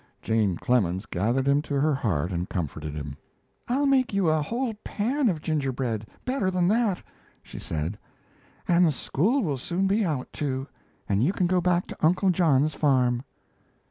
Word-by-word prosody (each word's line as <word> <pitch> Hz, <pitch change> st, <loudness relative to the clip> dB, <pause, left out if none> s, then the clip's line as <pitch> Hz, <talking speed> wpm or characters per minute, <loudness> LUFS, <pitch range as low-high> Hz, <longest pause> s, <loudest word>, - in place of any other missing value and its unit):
Jane 105 Hz, -6 st, +1 dB
Clemens 95 Hz, -6 st, +1 dB
gathered 115 Hz, +8 st, 0 dB
him 140 Hz, +1 st, +4 dB
to 145 Hz, -2 st, -2 dB
her 150 Hz, +2 st, +2 dB
heart 95 Hz, -, -1 dB
and 90 Hz, 0 st, -3 dB
comforted 75 Hz, -3 st, -4 dB
him. 70 Hz, -2 st, -6 dB, 0.5 s
"I'll 270 Hz, +4 st, +1 dB
make 260 Hz, -6 st, +2 dB
you 190 Hz, -4 st, +3 dB
a 155 Hz, 0 st, +2 dB
whole 235 Hz, -, -2 dB
pan 250 Hz, +5 st, 0 dB
of 160 Hz, -5 st, -2 dB
gingerbread, 130 Hz, -8 st, -1 dB, 0.2 s
better 250 Hz, -7 st, 0 dB
than 180 Hz, -2 st, +1 dB
that," 210 Hz, -, +1 dB, 0.4 s
she -, -, -10 dB
said, 80 Hz, +6 st, -4 dB, 0.7 s
"and 175 Hz, -2 st, +4 dB
school 210 Hz, -, 0 dB
will 145 Hz, -7 st, -1 dB
soon 180 Hz, +8 st, -1 dB
be 200 Hz, +3 st, +2 dB
out, 150 Hz, -8 st, -2 dB
too, 135 Hz, -2 st, -2 dB, 0.4 s
and 100 Hz, +2 st, +1 dB
you 175 Hz, +9 st, +2 dB
can 185 Hz, -, +1 dB
go 180 Hz, +1 st, +2 dB
back 180 Hz, 0 st, +2 dB
to -, -, -9 dB
Uncle 185 Hz, +4 st, +4 dB
John's 155 Hz, -4 st, +3 dB
farm." 125 Hz, -4 st, +2 dB
150 Hz, 170 wpm, -26 LUFS, 115-185 Hz, 0.7 s, him